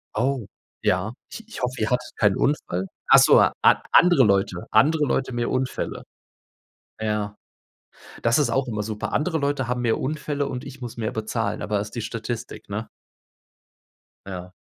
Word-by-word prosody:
Oh, 125 0 0 0.4
ja, 95 +5 +1 0.2
ich 225 -1 -9
ich 225 - -8
hoffe, 125 +1 -2
ihr 110 - 0
hattet 125 - -1
keinen 105 -2 +3
Unfall. 95 -10 0 0.2
Ach - - +8
so, - - +7
a - - +4 0.4
andere 175 -7 +7
Leute 95 -4 +1
andere 150 +7 +4
Leute, 130 -1 0
mehr 120 0 -1
Unfälle. 130 0 -2 1.0
Ja. 105 -1 -2 0.9
Das 115 +4 +3
ist 135 -6 +2
auch 135 +3 +1
immer 105 -3 -2
super. 105 0 -4
Andere 160 +2 0
Leute 140 -3 -1
haben 125 0 -1
mehr 115 -2 +1
Unfälle 145 0 -2
und 125 +1 -5
ich 135 -1 -10
muss 120 -2 -7
mehr 110 -2 -2
bezahlen, 110 -1 -2
aber 105 -1 0
ist 105 0 -6
die 120 - -3
Statistik, 115 +1 -5
ne? - - -4 1.4
Ja. 90 -1 -7
120 Hz, 165 wpm, -24 LUFS, 105-135 Hz, 1.4 s, Ach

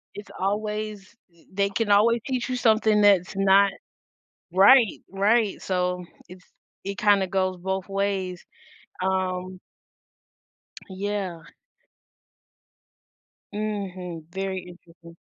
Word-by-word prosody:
it's 205 - -10
always 210 +1 -3 0.2
th 170 - -26
they 200 0 +1
can 205 +1 -1
always 225 +3 +4
teach 255 -2 -2
you 255 - -1
something 220 -3 +3
that's 195 -2 +4
not 195 0 +4 0.8
Right, 220 +2 +6
right, 205 +2 +2
so, 180 -1 -1 0.3
it's 185 0 -14 0.4
it 200 0 -5
kinda 205 -2 +3
goes 185 0 0
both 190 +1 -3
ways. 195 -2 -2 0.6
Um 185 -1 -2 1.3
yeah. 190 -3 -4 2.1
Mhm, 190 -6 -5
very 190 0 -3
interesting. 170 -1 -15
195 Hz, 100 wpm, -25 LUFS, 185-210 Hz, 2.1 s, Right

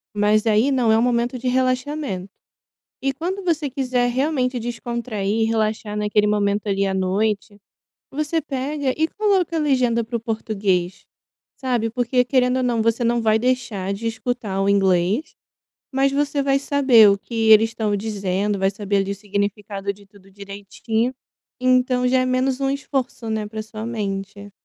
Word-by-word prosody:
mas 210 +2 +2
aí 220 +6 +3
não 245 -4 +2
é 220 - +5
o - - +2
momento 240 +1 +1
de 255 - -4
relaxamento. 255 -6 -1 0.7
E 270 0 0
quando 365 +7 -4
você 315 -5 0
quiser 250 -2 0
realmente 255 -1 0
descontrair 230 -3 -3
e - - +4
relaxar 215 -1 -1
naquele 210 0 +2
momento 205 0 0
ali 195 0 +1
à 190 - -1
noite, 205 +2 -1 0.5
você 305 +3 -1
pega 275 -1 -2
e 320 +1 +2
coloca 390 -5 0
a - - +1
legenda 255 -5 +2
para 235 +1 -3
o - - -7
português, 195 -5 -2 0.5
sabe, 245 -4 -1
porque 250 +1 +1
querendo 250 -1 +2
ou 255 - 0
não 235 -2 +1
você 230 +1 +1
não 235 0 +1
vai 220 0 +3
deixar 235 -6 -1
de 230 +3 -4
escutar 220 -4 -3
o 195 - +1
inglês, 195 - +1 0.6
mas 270 +1 +2
você 285 0 0
vai 275 0 +2
saber 265 -7 +5
o 200 - +2
que 230 - -13 0.2
eles 220 +1 +6
estão 215 -2 -1
dizendo, 200 -1 -2
vai 195 0 +2
saber 200 0 -1
ali 195 0 0
o - - -3
significado 200 0 -3
de 200 0 -18
tudo 195 -1 -20
direitinho. 200 +4 -3 0.5
Então 255 0 +2
já 260 +1 +3
é 255 - +1
menos 255 +1 0
um 270 - +1
esforço, 265 -4 -3
né, 215 -1 -2
pra 215 0 -5
sua 220 0 -7
mente. 200 -2 -5
230 Hz, 170 wpm, -21 LUFS, 205-255 Hz, 0.7 s, eles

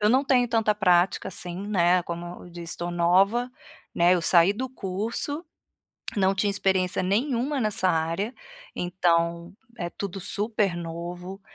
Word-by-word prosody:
eu 210 - +3
não 265 +3 +3
tenho 250 -2 +3
tanta 225 -2 +2
prática 180 -3 +2
assim, 180 +1 -5
né, 180 -2 +3
como 175 +1 -7
eu - - -12
disse, 170 0 -6
estou 175 0 -4
nova, 195 +8 +3 0.4
né, 175 +2 +4
eu 175 - 0
saí 170 +3 +5
do 255 +5 -4
curso, 230 - -3 0.7
não 190 -1 +3
tinha 200 +1 +1
experiência 190 -2 +1
nenhuma 250 +7 0
nessa 210 -4 +2
área, 165 +7 0 0.4
então 170 -1 0 0.3
é 175 -1 -3
tudo 195 -1 -6
super 205 -2 -1
novo, 175 +3 -6
185 Hz, 145 wpm, -26 LUFS, 175-210 Hz, 0.7 s, saí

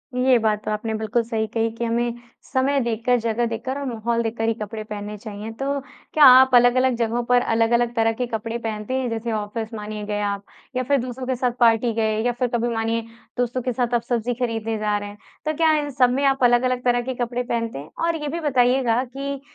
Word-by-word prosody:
ये 250 0 +4
बात 215 -1 0
तो - - -1
आपने 215 +1 -2
बिल्कुल 220 +2 0
सही 220 -1 -2
कही 225 +1 0
कि 230 +1 -4
हमें 235 +1 0 0.3
समय 275 +1 +1
देखकर, 235 +1 +1
जगह 230 +1 0
देखकर 235 +4 -3
और 280 - -4
माहौल 235 -1 -1
देखकर 225 0 -2
ही 225 - +2
कपड़े 215 +1 -5
पहनने 210 0 -6
चाहिए। 210 0 -7
तो, 275 +5 -2 0.3
क्या 305 - +5
आप 260 0 +8
अलग-अलग 245 +1 +5
जगहों 230 +1 0
पर 245 +1 +3
अलग-अलग 235 +1 +2
तरह 225 -1 +3
के - - +2
कपड़े 230 0 -3
पहनते 220 0 -4
हैं? 260 -1 0
जैसे 230 0 -3
ऑफ़िस 220 +1 -4
मानिए 210 -1 -5
गए 205 0 -2
आप 200 -1 -2 0.3
या 255 - 0
फिर 280 +3 +2
दोस्तों 255 +1 -5
के 260 - 0
साथ 250 0 0
पार्टी 230 0 +4
गए 220 -1 0
या 245 - +3
फिर 250 - +2
कभी 240 0 0
मानिए 225 +1 0 0.4
दोस्तों 245 +1 0
के 250 0 -2
साथ 245 0 -1
आप 240 - +3
सब्ज़ी 240 0 0
खरीदने 225 -2 -2
जा 210 -1 0
रहे 205 0 -6
हैं, 205 - -12 0.3
तो 310 - 0
क्या 320 +1 +3
इन 290 -1 -3
सब 250 -1 +6
में 265 +3 0
आप 270 -1 +2
अलग-अलग 245 +1 +3
तरह 245 -1 +2
के 260 +2 -4
कपड़े 245 +1 -2
पहनते 230 - -2
हैं? 145 - -10 0.2
और 335 0 +1
ये 295 - -3
भी 325 +4 -3
बताइएगा 250 -4 +2
कि 275 +2 -5
235 Hz, 225 wpm, -23 LUFS, 225-255 Hz, 0.4 s, आप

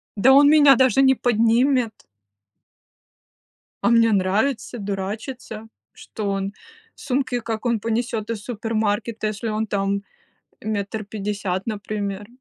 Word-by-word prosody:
Да 240 +6 +5
он 285 +1 +7
меня 290 -3 +7
даже 260 +2 +4
не 265 0 +5
поднимет. 240 +1 +2 1.9
А - - +2
мне 230 -1 +4
нравится 215 +6 0
дурачиться, 215 +3 -5 0.3
что 210 -2 -6
он 195 0 -2 0.4
сумки 255 -2 -2
как 225 0 -5
он 235 -2 +1
понесёт 225 0 -2
из 220 -3 -4
супермаркета, 220 -1 -2
если 215 +1 -4
он 215 +1 -2
там 200 0 -1 0.6
метр 215 0 -3
пятьдесят, 200 -2 -3
например. 205 -2 -4
220 Hz, 115 wpm, -22 LUFS, 205-240 Hz, 1.9 s, он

